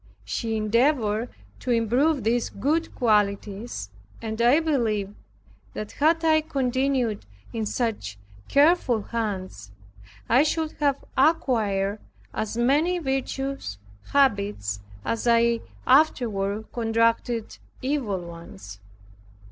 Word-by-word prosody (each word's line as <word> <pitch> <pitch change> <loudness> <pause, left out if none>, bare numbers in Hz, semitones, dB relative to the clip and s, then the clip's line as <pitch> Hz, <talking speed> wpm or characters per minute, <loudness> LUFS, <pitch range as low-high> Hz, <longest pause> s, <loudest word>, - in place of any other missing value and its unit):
She 225 -2 -2
endeavored 230 0 +1 0.3
to - - -6
improve 245 +5 +2
these 230 +2 +1
good 310 +10 -1
qualities, 205 - 0 0.3
and 220 0 -4
I 245 +6 +5
believe 225 -11 0 0.6
that 215 - -5
had 325 +2 +2
I 315 -1 +5
continued 260 - -1 0.3
in 220 -2 -2
such 205 - -2 0.3
careful 285 - +3
hands, 190 - -4 0.6
I 245 +4 +5
should 315 +1 0
have 280 -2 +1
acquired 215 -9 +2 0.3
as 220 +1 -3
many 295 +9 +2
virtuous 270 - -3 0.3
habits 200 - +1 0.3
as 230 +1 -1
I 235 0 +4 0.3
afterward 220 -7 +2
contracted 230 0 0 0.2
evil 255 -9 -1
ones. 165 - -10
235 Hz, 100 wpm, -25 LUFS, 210-275 Hz, 0.6 s, I